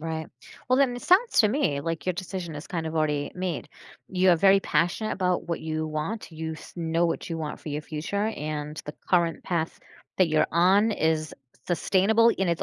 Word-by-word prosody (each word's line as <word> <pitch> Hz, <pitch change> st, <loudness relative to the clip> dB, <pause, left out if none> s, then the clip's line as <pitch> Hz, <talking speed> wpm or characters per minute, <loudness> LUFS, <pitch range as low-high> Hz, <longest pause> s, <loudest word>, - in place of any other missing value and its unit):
Right. 160 Hz, 0 st, -4 dB, 0.4 s
Well, 255 Hz, +1 st, +4 dB
then 255 Hz, -3 st, +3 dB
it -, -, -8 dB
sounds 395 Hz, +7 st, +4 dB
to 215 Hz, -, +4 dB
me 205 Hz, -, 0 dB
like 165 Hz, 0 st, -4 dB
your 185 Hz, -, +1 dB
decision 180 Hz, -2 st, -5 dB
is 145 Hz, +1 st, -7 dB
kind 165 Hz, -3 st, -3 dB
of 160 Hz, -, -4 dB
already 150 Hz, -2 st, 0 dB
made. 180 Hz, -3 st, -3 dB, 0.4 s
You 185 Hz, 0 st, +3 dB
are 175 Hz, -, +5 dB
very 195 Hz, +3 st, +6 dB
passionate 175 Hz, +5 st, 0 dB
about 180 Hz, -2 st, -1 dB
what 170 Hz, -, -2 dB
you 155 Hz, 0 st, -2 dB
want, 155 Hz, +7 st, -4 dB
you 160 Hz, 0 st, -4 dB
s 155 Hz, -, -12 dB
know 165 Hz, 0 st, 0 dB
what 165 Hz, -, -2 dB
you 165 Hz, -, -3 dB
want 155 Hz, -2 st, -5 dB
for -, -, -8 dB
your 150 Hz, +1 st, -3 dB
future, 165 Hz, +8 st, -2 dB
and 150 Hz, -5 st, -4 dB
the 150 Hz, -, -6 dB, 0.2 s
current 170 Hz, -2 st, +2 dB
path 170 Hz, -3 st, -2 dB, 0.4 s
that 185 Hz, -3 st, +4 dB
you're 155 Hz, -1 st, +3 dB
on 195 Hz, +6 st, +4 dB
is 160 Hz, -4 st, 0 dB, 0.3 s
sustainable, 200 Hz, +6 st, +3 dB
and 190 Hz, -1 st, +1 dB
it's 170 Hz, -1 st, 0 dB
170 Hz, 205 wpm, -26 LUFS, 155-190 Hz, 0.4 s, very